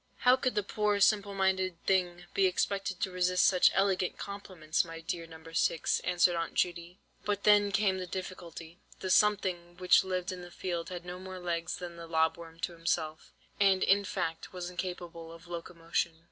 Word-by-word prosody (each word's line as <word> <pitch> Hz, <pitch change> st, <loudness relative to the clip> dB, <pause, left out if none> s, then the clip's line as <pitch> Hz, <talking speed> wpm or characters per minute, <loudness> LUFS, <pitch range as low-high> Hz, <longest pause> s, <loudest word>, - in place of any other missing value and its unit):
"How 250 Hz, 0 st, +6 dB
could 255 Hz, -1 st, -1 dB
the 210 Hz, -, +1 dB
poor 210 Hz, 0 st, 0 dB
simple 200 Hz, 0 st, +3 dB
minded 190 Hz, -1 st, +1 dB
thing 180 Hz, -2 st, +1 dB
be 195 Hz, -1 st, +4 dB
expected 195 Hz, 0 st, -1 dB
to 190 Hz, -, 0 dB
resist 180 Hz, 0 st, +2 dB
such 180 Hz, -2 st, +6 dB
elegant 190 Hz, -2 st, +1 dB
compliments, 185 Hz, -6 st, -2 dB
my 165 Hz, -1 st, -8 dB
dear 165 Hz, 0 st, -4 dB
No. 160 Hz, -1 st, -12 dB
6?" 165 Hz, -, +1 dB
answered 175 Hz, -1 st, +2 dB
Aunt 165 Hz, -1 st, -3 dB
Judy. 175 Hz, 0 st, -1 dB, 0.3 s
"But 205 Hz, -1 st, -1 dB
then 205 Hz, -1 st, +5 dB
came 195 Hz, -2 st, +2 dB
the 185 Hz, -, -5 dB
difficulty. 175 Hz, -2 st, -7 dB, 0.2 s
The 185 Hz, -, -2 dB
'something' 185 Hz, -4 st, +2 dB
which 180 Hz, 0 st, +5 dB
lived 185 Hz, -1 st, -2 dB
in 180 Hz, -1 st, -6 dB
the 175 Hz, -, -9 dB
field 175 Hz, -1 st, -4 dB
had 180 Hz, -1 st, -7 dB
no 180 Hz, +1 st, -6 dB
more 185 Hz, 0 st, -8 dB
legs 175 Hz, -1 st, -2 dB
than 175 Hz, -1 st, -7 dB
the 170 Hz, 0 st, -8 dB
lob 160 Hz, 0 st, +2 dB
worm 165 Hz, -1 st, -12 dB
himself, 165 Hz, -2 st, -3 dB, 0.3 s
and, 195 Hz, -2 st, +4 dB
in 200 Hz, +1 st, +4 dB
fact, 165 Hz, -4 st, -3 dB
was 180 Hz, -1 st, -5 dB
incapable 175 Hz, -2 st, -6 dB
of 165 Hz, +1 st, -13 dB
locomotion." 170 Hz, -1 st, -3 dB
180 Hz, 180 wpm, -31 LUFS, 170-190 Hz, 0.3 s, How